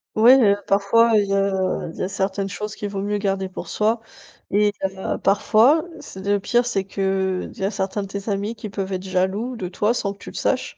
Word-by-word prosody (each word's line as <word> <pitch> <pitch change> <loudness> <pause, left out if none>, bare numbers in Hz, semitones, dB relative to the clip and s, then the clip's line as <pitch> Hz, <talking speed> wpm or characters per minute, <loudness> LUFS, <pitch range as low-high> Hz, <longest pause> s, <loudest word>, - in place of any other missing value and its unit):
Ouais, 240 +5 +7
heu, 200 -3 +4
parfois 205 +4 +4
il 205 - +2
y 195 - -1
a 195 -2 0
il - - -14
y - - -2
a 185 - -2
certaines 195 0 -2
choses 210 +2 -5
qu'il 205 - -4
vaut 195 -1 -4
mieux 205 +1 -1
garder 195 -1 -1
pour 185 - -8
soi 220 +2 +1 0.5
et 205 0 +3
heu, 190 0 -2
parfois, 230 - +4 0.2
c 190 - -10
le 200 +1 +1
pire 240 +5 +1
c'est 200 -6 -1
qu'il 190 -1 -1
y - - -5
a 195 - +1
certains 195 0 -2
de - - -6
tes 200 +1 -6
amis 205 +3 -1
qui 215 - -7
peuvent 195 -1 -4
être 185 0 -3
jaloux 190 +6 -1
de 185 -6 -5
toi 210 +5 +1
sans 200 -4 -2
que 200 - -11
tu - - -10
le - - -13
saches - - -1
200 Hz, 235 wpm, -22 LUFS, 190-210 Hz, 0.5 s, Ouais